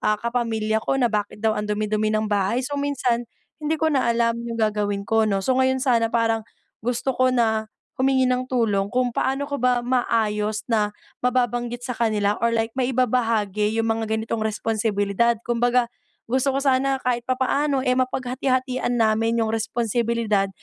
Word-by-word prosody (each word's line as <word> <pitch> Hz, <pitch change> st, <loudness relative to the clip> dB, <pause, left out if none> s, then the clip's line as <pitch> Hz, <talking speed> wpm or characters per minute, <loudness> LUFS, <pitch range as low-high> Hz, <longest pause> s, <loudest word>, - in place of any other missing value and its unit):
ah, 215 Hz, -, +2 dB
kapamilya 225 Hz, -2 st, -1 dB
ko 270 Hz, -, -1 dB
na 245 Hz, -3 st, +1 dB
bakit 205 Hz, -1 st, -2 dB
daw 220 Hz, -, +4 dB
ang 210 Hz, 0 st, -3 dB
dumi-dumi 215 Hz, 0 st, 0 dB
ng 215 Hz, 0 st, 0 dB
bahay. 210 Hz, +4 st, 0 dB
So 285 Hz, +1 st, -3 dB
minsan, 250 Hz, -5 st, -1 dB, 0.3 s
hindi 305 Hz, +1 st, 0 dB
ko 315 Hz, 0 st, +1 dB
na 260 Hz, -4 st, +2 dB
alam 235 Hz, 0 st, +1 dB
yung 235 Hz, -1 st, -5 dB
gagawin 210 Hz, -2 st, 0 dB
ko 225 Hz, 0 st, +2 dB
‘no. 195 Hz, -2 st, 0 dB
So 260 Hz, -, +2 dB
ngayon 260 Hz, 0 st, +3 dB
sana 235 Hz, -4 st, +3 dB
parang 225 Hz, -1 st, +1 dB, 0.4 s
gusto 245 Hz, +3 st, -1 dB
ko 255 Hz, 0 st, +2 dB
na 220 Hz, -3 st, +1 dB, 0.3 s
humingi 260 Hz, 0 st, +3 dB
ng 255 Hz, 0 st, 0 dB
tulong 210 Hz, -6 st, +1 dB
kung 250 Hz, +1 st, 0 dB
paano 270 Hz, +4 st, 0 dB
ko 285 Hz, -3 st, -4 dB
ba 250 Hz, -1 st, +2 dB
maayos 215 Hz, -4 st, 0 dB
na 215 Hz, -3 st, +1 dB, 0.3 s
mababanggit 245 Hz, -1 st, -1 dB
sa 250 Hz, -, -3 dB
kanila 215 Hz, -3 st, 0 dB
or 235 Hz, -, +3 dB
like 225 Hz, 0 st, -1 dB
maibabahagi 230 Hz, -5 st, 0 dB
yung 225 Hz, -, +1 dB
mga 220 Hz, 0 st, -2 dB
ganitong 225 Hz, 0 st, -3 dB
responsibilidad? 220 Hz, 0 st, 0 dB
Kumbaga 240 Hz, +1 st, +2 dB, 0.4 s
gusto 265 Hz, +3 st, 0 dB
ko -, -, +2 dB
sana 270 Hz, 0 st, +2 dB
kahit 240 Hz, -1 st, -1 dB
papaano, 265 Hz, +2 st, +1 dB
eh 250 Hz, -, +2 dB
mapaghati-hatian 255 Hz, 0 st, -1 dB
namin 225 Hz, +1 st, +2 dB
yung 220 Hz, -, -2 dB
responsibilidad 225 Hz, -2 st, 0 dB
235 Hz, 165 wpm, -23 LUFS, 220-255 Hz, 0.4 s, daw